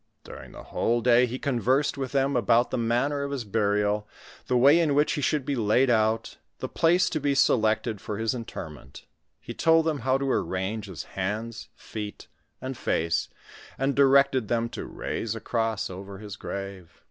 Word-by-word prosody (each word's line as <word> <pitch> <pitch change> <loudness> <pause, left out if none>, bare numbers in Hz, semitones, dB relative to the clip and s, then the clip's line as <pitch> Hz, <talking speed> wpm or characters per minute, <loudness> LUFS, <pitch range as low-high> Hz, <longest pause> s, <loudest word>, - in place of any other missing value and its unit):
During - - -11
the - - -11
whole 120 +1 0
day 125 +1 +5
he 125 +2 -4
conversed 130 +2 +1
with 135 -2 -4
them 140 0 +1
about 120 +1 +3
tlie - - -1
manner 125 +5 0
of 140 - -3
his 140 -4 -3
burial, 105 0 0 0.4
the 125 - +2
way 140 +7 +6
in 155 -4 +2
which 150 +1 +3
he 150 - -2
should 145 0 0
be 140 - -1
laid 120 +3 +3
out, 110 0 +1 0.2
the - - -4
place 175 +3 +3
to 155 - -1
be 140 -1 0
selected 110 -3 +2
for 105 -2 -5
his 110 +2 0
interment; 75 - -8 0.3
he - - -8
told 165 0 +3
them 155 -3 0
how 130 0 +1
to 135 -1 -1
arrange 100 +2 -2
his 95 -4 -7
hands, 110 +4 -4
feet, 105 -2 -8 0.3
and 130 +1 -5
face, 85 +1 0 0.5
and 135 +1 0
directed 135 -3 +4
them 115 +1 0
to - - -6
raise 115 -1 -4
a - - -5
cross 115 -3 -1
over 95 +1 -8
his 105 0 -8
grave. 100 -4 -7
115 Hz, 180 wpm, -26 LUFS, 105-135 Hz, 0.5 s, way